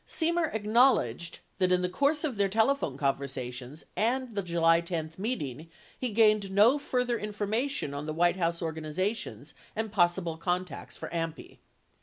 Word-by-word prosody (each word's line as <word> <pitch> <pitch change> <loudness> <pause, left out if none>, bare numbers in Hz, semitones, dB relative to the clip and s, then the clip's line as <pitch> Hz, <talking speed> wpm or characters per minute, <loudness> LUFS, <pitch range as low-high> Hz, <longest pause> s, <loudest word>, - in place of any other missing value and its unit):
Semer 335 -1 +1
acknowledged 210 - +2 0.2
that 185 -1 +2
in 180 0 +3
the - - +2
course 285 - +1
of 290 -6 -1
their 200 -1 +2
telephone 220 - +1
conversations 135 -1 -3
and 245 +2 0
the 200 - -1
July 170 -2 +3
10 165 -2 -4
meeting, 165 - -4 0.3
he 255 - -2
gained 215 -2 +3
no 215 +9 +5
further 250 -4 0
information 210 - -2
on 145 +2 -5
the 155 - -2
White 175 +2 +3
House 170 -1 -1
organization 160 +7 -3 0.3
and 220 -1 -2
possible 175 -4 +1
contacts 180 -2 -3
for - - -6
AMPI. 165 -1 -5
185 Hz, 150 wpm, -29 LUFS, 165-225 Hz, 0.3 s, no